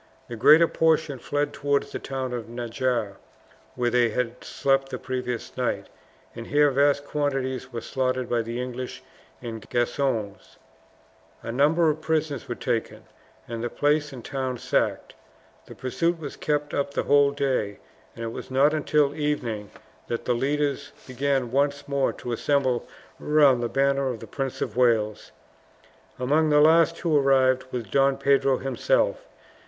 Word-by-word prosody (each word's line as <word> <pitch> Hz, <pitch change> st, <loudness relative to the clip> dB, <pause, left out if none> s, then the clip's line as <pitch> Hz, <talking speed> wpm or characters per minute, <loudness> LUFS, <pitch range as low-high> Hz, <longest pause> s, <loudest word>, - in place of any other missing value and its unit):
The 120 Hz, -, -5 dB
greater 155 Hz, +9 st, +6 dB
portion 160 Hz, -5 st, +1 dB
fled 145 Hz, +4 st, -2 dB
towards 140 Hz, 0 st, 0 dB
the -, -, -4 dB
town 130 Hz, -2 st, -4 dB
of 120 Hz, -2 st, -5 dB
Najarra, 120 Hz, -3 st, -2 dB, 0.6 s
where 120 Hz, -1 st, 0 dB
they 120 Hz, -1 st, +3 dB
had 125 Hz, +2 st, -3 dB
slept 135 Hz, 0 st, 0 dB
the -, -, -4 dB
previous 125 Hz, -2 st, -4 dB
night, -, -, -2 dB, 0.5 s
and 115 Hz, 0 st, -7 dB
here 145 Hz, 0 st, +4 dB
vast 140 Hz, +1 st, +2 dB
quantities 135 Hz, -3 st, -2 dB
were 115 Hz, -1 st, -5 dB
slaughtered 130 Hz, -2 st, -1 dB
by 120 Hz, -1 st, +1 dB
the 115 Hz, +2 st, -5 dB
English 125 Hz, 0 st, -5 dB, 0.4 s
and 115 Hz, -3 st, -7 dB
Gascons. 120 Hz, -4 st, -2 dB, 0.9 s
A 115 Hz, -, -4 dB
number 150 Hz, +7 st, +3 dB
of 155 Hz, +1 st, -6 dB
prisoners 155 Hz, -5 st, -1 dB
were 120 Hz, -, -2 dB
taken, 120 Hz, -3 st, -3 dB, 0.4 s
and 115 Hz, 0 st, -5 dB
the 120 Hz, -, -1 dB
palace 145 Hz, +2 st, +1 dB
and 125 Hz, -4 st, -10 dB
town 130 Hz, -2 st, -3 dB
sacked. -, -, -1 dB, 0.5 s
The -, -, -11 dB
pursuit 165 Hz, +7 st, -1 dB
was 145 Hz, -3 st, -7 dB
kept 150 Hz, -1 st, -2 dB
up 140 Hz, 0 st, -2 dB
the -, -, 0 dB
whole 145 Hz, 0 st, +4 dB
day, 130 Hz, -8 st, -1 dB, 0.4 s
and 115 Hz, -, -5 dB
it 115 Hz, -, -4 dB
was -, -, -8 dB
not 140 Hz, +3 st, +3 dB
until 150 Hz, -2 st, +2 dB
evening 125 Hz, -9 st, -2 dB, 0.4 s
that 115 Hz, -, -4 dB
the 125 Hz, -, +2 dB
leaders 140 Hz, +3 st, -1 dB
began 130 Hz, -1 st, -1 dB
once 140 Hz, +1 st, 0 dB
more 140 Hz, -1 st, +1 dB
to 120 Hz, -, -7 dB
assemble 130 Hz, 0 st, 0 dB, 0.3 s
round 145 Hz, -5 st, +4 dB
the 120 Hz, -, -1 dB
banner 140 Hz, +2 st, +1 dB
of 120 Hz, -3 st, -4 dB
the 115 Hz, -, -9 dB
Prince 135 Hz, +3 st, -4 dB
of -, -, -6 dB
Wales. 115 Hz, -4 st, +1 dB, 0.9 s
Among 150 Hz, +5 st, +2 dB
the 150 Hz, 0 st, +5 dB
last 165 Hz, +2 st, +5 dB
who 165 Hz, -3 st, +1 dB
arrived 130 Hz, -2 st, +3 dB
was 125 Hz, -2 st, -3 dB
Don 135 Hz, +6 st, +2 dB
Pedro 135 Hz, -1 st, +3 dB
himself. -, -, 0 dB
135 Hz, 160 wpm, -25 LUFS, 120-145 Hz, 0.9 s, greater